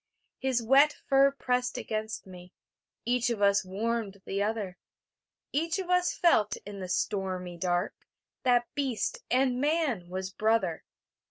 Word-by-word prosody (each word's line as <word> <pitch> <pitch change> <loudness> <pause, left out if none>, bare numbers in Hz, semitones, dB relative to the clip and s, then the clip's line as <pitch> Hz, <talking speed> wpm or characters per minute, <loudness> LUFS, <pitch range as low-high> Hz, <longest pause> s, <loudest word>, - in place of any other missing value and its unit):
His 260 -3 0
wet 275 +5 +5
fur 275 0 +5
pressed 250 -2 -1
against 220 0 -4
me; 180 -1 -12 0.5
Each 245 0 +1
of 235 -3 -2
us 200 -1 +4
warmed 200 0 -3
the 195 +1 -2
other; 205 -4 -2 0.7
Each 330 +4 0
of 370 -2 -3
us 360 0 +3
felt 215 - +3
in 205 -1 -7
the 185 -1 -6
stormy 185 -2 -2
dark 175 0 0 0.5
That 245 -1 +3
beast 280 - -1
and 255 0 +2
man 290 - 0
was 190 +1 -4
brother. 215 -5 0
225 Hz, 140 wpm, -29 LUFS, 190-265 Hz, 0.7 s, wet